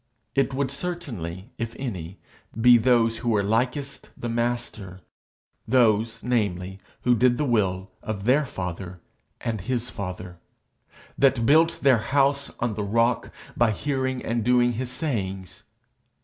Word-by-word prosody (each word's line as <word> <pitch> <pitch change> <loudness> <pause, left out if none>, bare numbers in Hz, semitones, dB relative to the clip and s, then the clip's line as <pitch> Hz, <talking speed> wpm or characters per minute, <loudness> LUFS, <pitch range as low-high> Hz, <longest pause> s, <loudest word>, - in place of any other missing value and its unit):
It 135 0 +2
would 135 -1 0
certainly, 130 - -5
if 115 0 -4
any, 95 -9 -5 0.4
be 120 +1 +7
those 115 -1 +3
who 120 - -2
were 105 -3 +2
likest 125 +7 -1
the 120 - -4
Master 115 -5 -3 0.7
those, 115 -2 +2
namely, 95 -6 -1 0.2
that 120 -2 +3
did 125 -1 +4
the 150 - 0
will 95 -6 0
of 105 -3 -4
their 130 +7 +4
father 90 - -6 0.4
and 110 -4 -2
his 120 +3 -2
father, 90 -2 -6 0.8
that 135 -4 +4
built 160 +5 +4
their 130 -5 +5
house 140 +3 +1
on 120 -2 0
the 105 - -3
rock 115 +3 +1 0.2
by 120 -1 +3
hearing 130 +2 -2
and 115 0 -1
doing 120 +1 +3
his 125 +2 -3
sayings. 100 - -3
115 Hz, 135 wpm, -25 LUFS, 100-130 Hz, 0.8 s, be